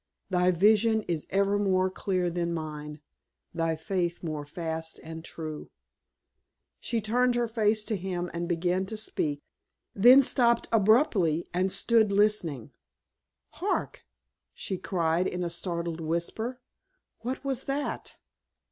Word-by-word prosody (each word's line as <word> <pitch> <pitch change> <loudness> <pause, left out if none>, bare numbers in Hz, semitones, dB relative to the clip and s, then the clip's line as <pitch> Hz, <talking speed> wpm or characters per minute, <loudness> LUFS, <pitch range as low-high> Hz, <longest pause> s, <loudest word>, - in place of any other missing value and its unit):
"Thy 180 0 +3
vision 215 +4 +4
is 165 -5 -3
ever 200 +1 +2
more 185 -2 +2
clear 185 -2 -1
than 170 0 -1
mine, 150 -1 -6 0.5
thy 165 -1 0
faith 175 +2 -2
more 155 -3 -4
fast 160 0 -4
and 160 0 -8
true." 155 -2 -7 1.1
She 235 - -1
turned 245 +3 +1
her 240 -1 +1
face 220 -1 +1
to 215 - -2
him 180 -2 -3
and 170 +1 -3
began 180 +2 0
to 220 - -6
speak, 150 -9 -2 0.5
then 250 +7 +8
stopped 235 -2 +3
abruptly 210 - +3
and 185 +2 +1
stood 220 +2 +3
listening. 195 - +1 0.8
"Hark!" - - -2 0.5
she 190 - -4
cried 175 -2 0
in 180 0 -3
a 170 - -2
startled 170 -1 -3
whisper, 170 +10 -3 0.6
"what 255 +4 -5
was 270 -2 -1
that?" 280 +1 -3
185 Hz, 130 wpm, -28 LUFS, 165-220 Hz, 1.1 s, then